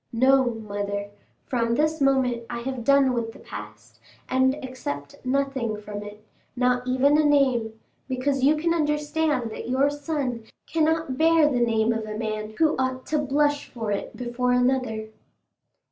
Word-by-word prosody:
No, 260 Hz, +3 st, +4 dB
mother; 205 Hz, -1 st, -4 dB, 0.3 s
from 235 Hz, -2 st, 0 dB
this 310 Hz, +2 st, +1 dB
moment 255 Hz, -4 st, +2 dB
I 235 Hz, 0 st, -4 dB
have 260 Hz, -1 st, -4 dB
done 275 Hz, 0 st, +4 dB
with 230 Hz, -2 st, -2 dB
the -, -, -13 dB
past, -, -, -10 dB, 0.3 s
and 260 Hz, +1 st, +2 dB
accept 145 Hz, -, -6 dB
nothing 265 Hz, -4 st, -1 dB
from 205 Hz, -1 st, -7 dB
it—not 245 Hz, +4 st, -3 dB
even 275 Hz, +4 st, +3 dB
a -, -, +4 dB
name, 255 Hz, -7 st, +2 dB, 0.3 s
because 260 Hz, +1 st, 0 dB
you 295 Hz, +3 st, +5 dB
can 335 Hz, +2 st, +1 dB
understand 300 Hz, -5 st, 0 dB
that 230 Hz, -, -6 dB
your 270 Hz, +3 st, +2 dB
son 285 Hz, -6 st, -3 dB, 0.2 s
cannot 320 Hz, -3 st, 0 dB
bear 325 Hz, -1 st, +5 dB
the 260 Hz, -4 st, +1 dB
name 230 Hz, -1 st, +2 dB
of 225 Hz, -1 st, -4 dB
a 215 Hz, 0 st, -5 dB
man 215 Hz, -1 st, -4 dB
who 315 Hz, -1 st, +3 dB
ought 260 Hz, 0 st, -1 dB
to 305 Hz, -, 0 dB
blush 290 Hz, +1 st, +1 dB
for 225 Hz, -4 st, -4 dB
it 200 Hz, -, -4 dB
before 250 Hz, 0 st, -1 dB
another." 250 Hz, -3 st, 0 dB
255 Hz, 155 wpm, -25 LUFS, 225-285 Hz, 0.3 s, you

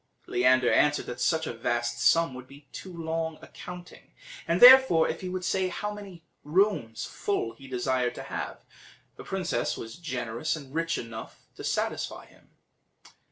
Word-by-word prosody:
Leander 125 Hz, 0 st, +3 dB
answered 150 Hz, 0 st, +3 dB
that 125 Hz, -, -6 dB
such 160 Hz, -1 st, +1 dB
a -, -, -4 dB
vast 120 Hz, 0 st, -2 dB
sum 165 Hz, -1 st, +4 dB
would 130 Hz, 0 st, -10 dB
be 140 Hz, +1 st, -16 dB
too 190 Hz, -, -8 dB
long 160 Hz, -1 st, -3 dB
a -, -, -10 dB
counting, 180 Hz, 0 st, -11 dB, 0.3 s
and 170 Hz, +2 st, +1 dB
therefore, 250 Hz, -9 st, +9 dB
if 160 Hz, -, -4 dB
he 185 Hz, -, -4 dB
would 185 Hz, 0 st, -4 dB
say 190 Hz, 0 st, +1 dB
how 210 Hz, +3 st, -4 dB
many 195 Hz, -5 st, -10 dB, 0.2 s
rooms 150 Hz, -, +1 dB
full 155 Hz, -, -2 dB
he 135 Hz, -, -14 dB
desired 125 Hz, -1 st, -1 dB
to -, -, -7 dB
have, -, -, -6 dB, 0.5 s
the -, -, -10 dB
princess -, -, -2 dB
was 115 Hz, +5 st, -8 dB
generous 130 Hz, -4 st, -3 dB
and 140 Hz, -3 st, -11 dB
rich 165 Hz, +1 st, -1 dB
enough 115 Hz, -1 st, -8 dB
to -, -, -9 dB
satisfy -, -, -2 dB
him. -, -, -23 dB
155 Hz, 165 wpm, -28 LUFS, 125-175 Hz, 0.5 s, therefore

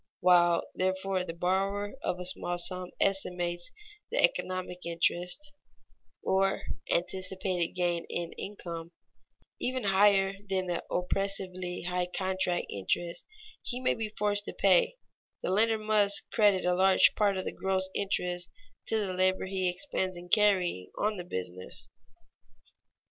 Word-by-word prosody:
While, 175 Hz, -1 st, +5 dB
therefore, 190 Hz, 0 st, 0 dB
the 165 Hz, -2 st, -6 dB
borrower 195 Hz, +3 st, 0 dB
of 180 Hz, -, -2 dB
a 180 Hz, -, -4 dB
small 175 Hz, -1 st, +1 dB
sum 180 Hz, +1 st, 0 dB
estimates 180 Hz, -3 st, 0 dB, 0.4 s
the -, -, -3 dB
economic 185 Hz, -, 0 dB
interest 175 Hz, -, -1 dB, 0.7 s
(or 195 Hz, 0 st, +1 dB, 0.3 s
anticipated 185 Hz, -1 st, -1 dB
gain 175 Hz, -2 st, 0 dB
in 170 Hz, -1 st, -3 dB
income) 170 Hz, -4 st, -7 dB, 0.7 s
even 255 Hz, 0 st, -2 dB
higher 195 Hz, 0 st, +4 dB, 0.2 s
than 190 Hz, -1 st, 0 dB
the 175 Hz, -1 st, -2 dB
oppressively 185 Hz, -1 st, -2 dB
high 180 Hz, 0 st, -1 dB
contract 185 Hz, -1 st, 0 dB
interest 170 Hz, -, -2 dB, 0.4 s
he 245 Hz, -, -3 dB
may 255 Hz, -, +2 dB
be 220 Hz, -1 st, -4 dB
forced 205 Hz, 0 st, +2 dB
to -, -, -6 dB
pay, 195 Hz, -, +4 dB, 0.5 s
the -, -, 0 dB
lender 220 Hz, +3 st, +3 dB
must 210 Hz, -2 st, +2 dB
credit 205 Hz, -5 st, +3 dB
a 180 Hz, -, +3 dB
large 190 Hz, +1 st, +5 dB
part 200 Hz, -2 st, +2 dB
of 185 Hz, -, -3 dB
the -, -, -2 dB
gross 190 Hz, 0 st, 0 dB
interest 180 Hz, -3 st, -1 dB, 0.4 s
to 220 Hz, -, +1 dB
the 200 Hz, -3 st, -1 dB
labor 185 Hz, +1 st, +2 dB
he 190 Hz, -1 st, 0 dB
expends 185 Hz, -2 st, -1 dB
in 175 Hz, 0 st, -10 dB
carrying 185 Hz, -, +3 dB
on 210 Hz, 0 st, 0 dB
the 180 Hz, -, -5 dB
business. 90 Hz, -, -5 dB
185 Hz, 135 wpm, -30 LUFS, 175-200 Hz, 0.7 s, While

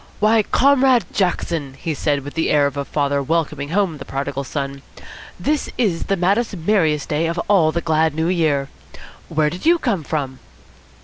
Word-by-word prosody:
"Why, 220 Hz, +1 st, +4 dB
Comrade 260 Hz, +1 st, +3 dB
Jackson," 165 Hz, -7 st, -1 dB
he 160 Hz, +3 st, -3 dB
said, 145 Hz, -1 st, -1 dB
with 145 Hz, -, -8 dB
the 160 Hz, -, 0 dB
air 145 Hz, -1 st, +4 dB
of 140 Hz, 0 st, -2 dB
a 140 Hz, -, -2 dB
father 140 Hz, 0 st, -1 dB
welcoming 150 Hz, -1 st, -1 dB
home 175 Hz, -4 st, 0 dB
the -, -, -6 dB
prodigal 140 Hz, 0 st, -4 dB
son, 140 Hz, 0 st, -4 dB, 0.6 s
"this 300 Hz, 0 st, -1 dB
is 200 Hz, -9 st, 0 dB
the 195 Hz, -, 0 dB
maddest, 200 Hz, +4 st, +1 dB
merriest 160 Hz, -5 st, +1 dB
day 155 Hz, +2 st, 0 dB
of 170 Hz, +1 st, -3 dB
all 180 Hz, -6 st, +4 dB
the 170 Hz, -, -2 dB
glad 160 Hz, -2 st, +1 dB
New 160 Hz, +1 st, 0 dB
Year. 155 Hz, -6 st, +1 dB, 0.6 s
Where 155 Hz, -1 st, +1 dB
did 180 Hz, -, -8 dB
you 340 Hz, +2 st, +5 dB
come 230 Hz, -, -1 dB
from?" 140 Hz, -4 st, -3 dB
160 Hz, 180 wpm, -20 LUFS, 145-195 Hz, 0.6 s, you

